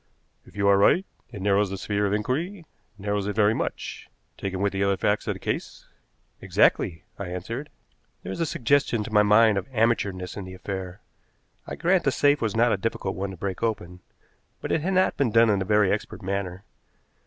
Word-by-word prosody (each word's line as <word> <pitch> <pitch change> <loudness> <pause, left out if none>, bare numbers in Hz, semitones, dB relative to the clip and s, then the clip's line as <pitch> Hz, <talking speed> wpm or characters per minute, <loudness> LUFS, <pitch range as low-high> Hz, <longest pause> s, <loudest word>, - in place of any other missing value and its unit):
"If - - -17
you 100 0 +1
are 100 0 +5
right, 180 - +4 0.3
it 100 - -7
narrows 100 0 +2
the 95 - -4
sphere 100 +1 -1
of - - -2
inquiry 160 - -2 0.3
narrows 100 0 -2
it 105 - -3
very 105 0 +4
much, - - -5 0.3
taken 95 -1 -4
with 100 0 0
the 95 0 0
other 100 -1 +2
facts 105 +3 0
of - - -1
the - - -10
case." - - -4 0.5
"Exactly," 80 -2 +2 0.2
I 100 - -4
answered. 115 - -5 0.5
"There - - -5
is - - -5
a 165 - 0
suggestion 125 -4 +1
to 110 - -8
my 105 - +6
mind 105 0 +5
of - - -9
amateurishness 105 -6 0
in 100 - -5
the 95 0 -9
affair. 95 0 -6 0.7
I - - -5
grant 180 +1 +2
the 135 - +2
safe 145 +2 +3
was 110 -2 -1
not 120 +1 +4
a - - +1
difficult 95 -2 -2
one 100 +1 -3
to 95 - -8
break 95 +1 -4
open, 90 -6 -3 0.6
but - - -5
it 160 - +1
had 190 +5 -1
not 185 0 +2
been 135 -4 +2
done 115 0 +5
in 100 -2 +1
a - - -1
very 105 -1 +3
expert 110 0 -3
manner. 95 -1 -3
105 Hz, 210 wpm, -25 LUFS, 95-115 Hz, 0.7 s, my